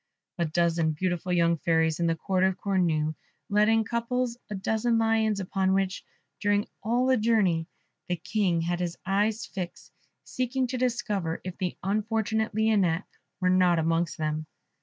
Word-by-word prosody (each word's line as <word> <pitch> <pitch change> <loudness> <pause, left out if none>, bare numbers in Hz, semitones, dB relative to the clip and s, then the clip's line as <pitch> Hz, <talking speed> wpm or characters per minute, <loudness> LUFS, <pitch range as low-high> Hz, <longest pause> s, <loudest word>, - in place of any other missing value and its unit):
A 170 - +2
dozen 165 0 +1
beautiful 180 +2 -2
young 170 -1 +3
fairies 160 0 +1
of 170 - +2
the 165 - +2
Court 185 +2 0
of 190 0 +2
Cornue, 170 -6 +1 0.4
led 210 +1 +4
in 225 0 +4
couples 235 +1 -1
a 210 - -3
dozen 220 +4 +1
lions, 225 -2 +2
upon 190 0 0
which, 195 -1 -1 0.4
during 205 0 +2 0.2
all 240 +3 +1
the 260 0 +4
journey, 205 -8 +2 0.4
the 180 - 0
King 175 0 0
had 175 +1 -1
his 175 -1 -3
eyes 210 +4 +1
fixed, 180 -3 -7 0.3
seeking 255 +1 -1
to 250 +1 -3
discover 210 -9 -1
if 185 -1 -6
the 180 -3 -2
unfortunate 220 +2 0
Lionette 205 -5 +2 0.3
were 185 -1 +2
not 180 -2 +4
amongst 165 +1 0
them. 155 0 -2
190 Hz, 160 wpm, -27 LUFS, 170-220 Hz, 0.4 s, led